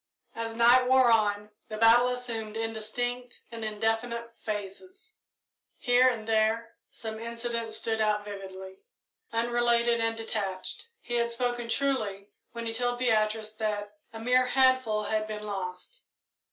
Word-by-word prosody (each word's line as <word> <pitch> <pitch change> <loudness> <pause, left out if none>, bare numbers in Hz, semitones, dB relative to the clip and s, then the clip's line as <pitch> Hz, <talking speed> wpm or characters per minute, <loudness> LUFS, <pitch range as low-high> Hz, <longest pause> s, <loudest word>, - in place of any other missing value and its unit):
As 230 0 -4
night 240 +2 +6
wore 260 -2 +5
on, 210 -2 +2 0.2
the 215 - -5
battle 230 +2 +6
assumed 230 -3 -3
indistinct 245 +3 -3
and 230 -1 -6
indefinite 225 +2 -2
phases. 300 - -7 0.6
Here 250 0 +4
and 225 -3 -1
there 225 +1 +1 0.2
some 220 -1 -5
incident 230 0 -3
stood 220 0 0
out 210 -1 +1
vividly; 190 -2 -8 0.5
unrelated 235 0 +2
and 225 0 0
detached. 210 - -4
He 240 - -7
had 235 0 +1
spoken 240 0 -2
truly 215 -8 -1 0.2
when 235 0 -6
he 225 - -2
told 245 +1 -1
Beatrice 220 -3 +1
that 210 -1 -3 0.2
"a 225 - -8
mere 250 +2 +3
handful" 255 -5 +3
had 215 0 -1
been 210 -1 -6
lost. 195 - -5
225 Hz, 135 wpm, -28 LUFS, 215-245 Hz, 0.6 s, night